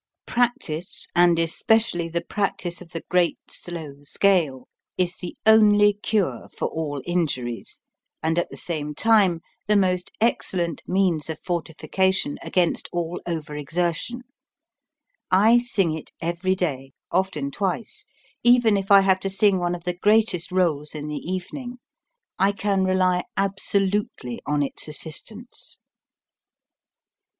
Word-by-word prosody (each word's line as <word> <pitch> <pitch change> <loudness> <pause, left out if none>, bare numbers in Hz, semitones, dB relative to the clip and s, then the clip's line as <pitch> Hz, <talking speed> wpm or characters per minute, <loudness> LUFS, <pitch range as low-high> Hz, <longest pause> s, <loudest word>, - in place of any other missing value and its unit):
Practice, 195 -9 -2
and 175 -1 +5
especially 170 +1 +1
the 170 0 -2
practice 185 -3 -2
of 175 - -12
the 165 - -6
great, 180 -2 +2
slow 160 -5 -7
scale, 150 -5 +1 0.3
is 180 -1 0
the 180 - -8
only 210 -1 +6
cure 205 -1 -1
for - - -1
all 150 -3 -3
in 175 -1 +1
juries, 120 -4 -6 0.4
and 160 +2 +1
at 175 - -2
the - - -10
same 150 -3 -4
time 200 -5 +3 0.3
the 210 - +3
most 185 -2 +1
excel 220 -4 +1
lent 170 -2 -2
means 180 -5 +1
of 160 - -4
fortification 175 0 -1
against 175 -2 0
all 175 0 -3
over 155 -3 -4
exertion. 170 - -2 1.1
I 215 +6 +6
sing 200 -9 0
it 160 - -7
every 175 +3 0
day, 135 -7 -3 0.2
often 170 -6 0
twice, 195 +6 -3 0.3
even 240 -3 +5
if 195 0 -4
I 200 -1 +8
have 190 -1 +3
to 195 - -2
sing 195 0 +3
one 175 0 0
of 170 - -10
the 180 - -1
greatest 210 -1 +2
roles 160 -5 0
in 150 0 -5
the 150 +4 -4
evening. 245 +7 -5 0.6
I 195 +1 +3
can 200 -2 0
rely 185 -1 +2
absolutely 195 - -1
on 145 0 +1
its 140 - -1
assistance. 210 - -6
180 Hz, 135 wpm, -24 LUFS, 160-200 Hz, 1.1 s, I